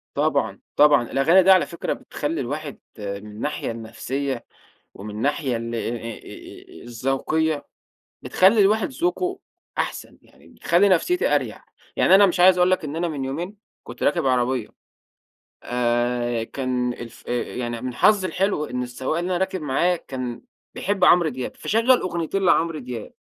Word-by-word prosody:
طبعًا، -, -, 0 dB, 0.2 s
طبعًا، 145 Hz, -5 st, +5 dB
الأغاني 170 Hz, +7 st, +5 dB
دي 190 Hz, -, +6 dB
على 185 Hz, -2 st, +6 dB
فكرة 170 Hz, -, -3 dB
بتخلّي 150 Hz, +1 st, -4 dB
الواحد 145 Hz, +3 st, -5 dB, 0.2 s
من -, -, -10 dB, 0.3 s
الناحية 115 Hz, +3 st, -3 dB
النفسية 120 Hz, +3 st, -4 dB, 0.5 s
ومن 105 Hz, +1 st, -8 dB
ناحية 140 Hz, -3 st, 0 dB
ال 115 Hz, 0 st, -5 dB
أ -, -, -1 dB
أ 115 Hz, -2 st, -8 dB
الذوقية 135 Hz, +6 st, -1 dB, 0.6 s
بتخلّي 200 Hz, +4 st, +4 dB
الواحد 215 Hz, -, +3 dB
ذوقه 360 Hz, +5 st, -2 dB, 0.4 s
أحسن، -, -, -4 dB
يعني -, -, -22 dB
بتخلّي 185 Hz, +4 st, +2 dB
نفسيتي 355 Hz, -, +2 dB
أريح، -, -, -2 dB, 0.3 s
يعني -, -, +5 dB
أنا 200 Hz, +1 st, +8 dB
مش 180 Hz, -1 st, -1 dB
عايز 180 Hz, 0 st, +7 dB
أقول 180 Hz, +1 st, +4 dB
لك 185 Hz, -3 st, +1 dB
إن 150 Hz, +2 st, -5 dB
أنا 170 Hz, 0 st, -1 dB
من 140 Hz, -4 st, -4 dB
يومين 170 Hz, +10 st, -4 dB, 0.3 s
كنت -, -, -10 dB
راكب 170 Hz, -5 st, +1 dB
عربية. 125 Hz, -2 st, +1 dB, 1.0 s
آآ، 120 Hz, -1 st, 0 dB
كان 125 Hz, -1 st, -2 dB
الف 120 Hz, -1 st, -11 dB
يعني 120 Hz, -1 st, -3 dB
من 130 Hz, -1 st, -4 dB
حظي 195 Hz, -, +3 dB
الحلو 185 Hz, -5 st, 0 dB
إن 125 Hz, -2 st, -3 dB
السواق 130 Hz, +6 st, -3 dB
اللي 175 Hz, +1 st, -3 dB
أنا 180 Hz, -, +1 dB
راكب 190 Hz, -2 st, -2 dB
معاه 170 Hz, +6 st, +1 dB
كان 130 Hz, -6 st, -6 dB, 0.3 s
بيحب 195 Hz, -2 st, -1 dB
عمرو 170 Hz, -3 st, +5 dB
دياب، 130 Hz, -1 st, -6 dB
فشغّل 230 Hz, +4 st, +3 dB
أغنيتين 175 Hz, +2 st, -2 dB
لعمرو 165 Hz, -2 st, +2 dB
دياب، 120 Hz, -4 st, -7 dB
145 Hz, 150 wpm, -23 LUFS, 125-180 Hz, 1.0 s, أنا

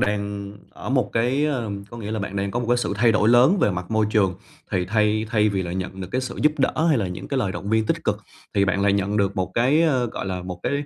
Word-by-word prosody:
đang 100 Hz, -1 st, -2 dB, 0.2 s
ở -, -, -9 dB
một 130 Hz, -2 st, +1 dB
cái, 125 Hz, +5 st, +1 dB
ờ 125 Hz, -8 st, -2 dB, 0.2 s
có 120 Hz, -, -9 dB
nghĩa 105 Hz, -2 st, -6 dB
là 110 Hz, -, -2 dB
bạn 100 Hz, 0 st, -4 dB
đang 100 Hz, 0 st, -1 dB
có 120 Hz, -, -2 dB
một 120 Hz, -, -3 dB
cái 120 Hz, -, +4 dB
sự 120 Hz, -, -1 dB
thay 115 Hz, +2 st, +4 dB
đổi 105 Hz, 0 st, +3 dB
lớn 125 Hz, -, +5 dB
về -, -, +3 dB
mặt 90 Hz, 0 st, -5 dB
môi 110 Hz, -1 st, +2 dB
trường 95 Hz, -4 st, +2 dB, 0.4 s
thì 90 Hz, -, 0 dB
thay 105 Hz, +2 st, +1 dB
thay 105 Hz, -1 st, +3 dB
vì 95 Hz, -2 st, -1 dB
là 85 Hz, -, -5 dB
nhận 95 Hz, +1 st, -5 dB
được 90 Hz, -, -5 dB
cái 130 Hz, -, +1 dB
sự 130 Hz, -, -6 dB
giúp 150 Hz, -, +4 dB
đỡ, 155 Hz, +4 st, +1 dB
hay 150 Hz, -7 st, +3 dB
là 100 Hz, -, -1 dB
những 90 Hz, -, -7 dB
cái 135 Hz, -, -1 dB
lời 100 Hz, -7 st, 0 dB
động 100 Hz, -, -6 dB
viên 110 Hz, -1 st, +2 dB
tích -, -, -1 dB
cực -, -, +1 dB, 0.4 s
thì 100 Hz, -, +3 dB
bạn 100 Hz, 0 st, 0 dB
lại 100 Hz, -1 st, +3 dB
nhận 100 Hz, +1 st, 0 dB
được 100 Hz, -2 st, 0 dB
một 90 Hz, -1 st, -1 dB
cái, 135 Hz, +7 st, +3 dB
ờ, 130 Hz, -7 st, +2 dB
gọi 110 Hz, -, -5 dB
là, 90 Hz, -1 st, -3 dB
một 90 Hz, -1 st, -7 dB
cái, -, -, -1 dB
105 Hz, 295 wpm, -23 LUFS, 100-120 Hz, 0.4 s, lớn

